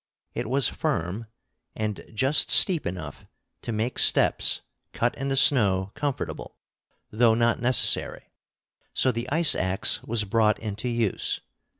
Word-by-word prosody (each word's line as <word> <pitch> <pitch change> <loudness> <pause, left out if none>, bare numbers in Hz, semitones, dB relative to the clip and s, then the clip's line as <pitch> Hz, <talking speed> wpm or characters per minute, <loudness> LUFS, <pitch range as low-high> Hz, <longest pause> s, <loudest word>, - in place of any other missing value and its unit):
It - - -5
was 135 +1 +3
firm, 110 - -4 0.5
and 105 -2 -5
just 130 +7 +2
steep 175 -5 +5
enough 85 -5 -8 0.3
to - - -6
make 110 +3 -3
steps - - +3 0.3
cut 120 +1 -1
in 135 +1 -5
the 135 - -1
snow 100 -9 +3
comfortable, 145 -2 -5 0.5
though 115 +1 +2
not 115 0 0
necessary; 125 -1 +1 0.6
so 130 - +1
the 120 +1 -6
ice 160 +3 +4
axe 95 +1 0
was 115 -1 -1
brought 105 +1 +1
into 110 +2 -6
use. 115 -4 -2
115 Hz, 130 wpm, -24 LUFS, 105-130 Hz, 0.6 s, steep